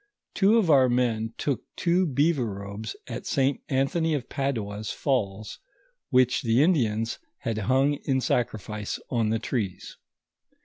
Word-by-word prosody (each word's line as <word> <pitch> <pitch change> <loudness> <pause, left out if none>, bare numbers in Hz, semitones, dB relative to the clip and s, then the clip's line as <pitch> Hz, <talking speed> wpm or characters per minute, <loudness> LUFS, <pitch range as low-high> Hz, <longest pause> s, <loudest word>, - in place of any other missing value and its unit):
Two 210 +3 +4
of 190 -8 +3
our 130 -3 +6
men 115 -2 0
took 140 -4 -1
two 180 +1 +2
beaver 145 -2 +1
robes 100 +2 -6
at - - -6
St. 135 0 +1
Anthony 150 +4 +1
of 130 -4 -4
Padua's 110 -6 -3
falls, 110 -6 -2 0.5
M'hich 125 -1 +3
the 120 +3 +3
Indians 115 -10 +1 0.2
had 115 -2 -2
hung 135 +2 +3
in 135 -2 +2
sacrifice 110 -4 -2
on 115 -3 +1
the 110 - +1
trees. 110 -5 -4
125 Hz, 135 wpm, -26 LUFS, 110-140 Hz, 0.5 s, our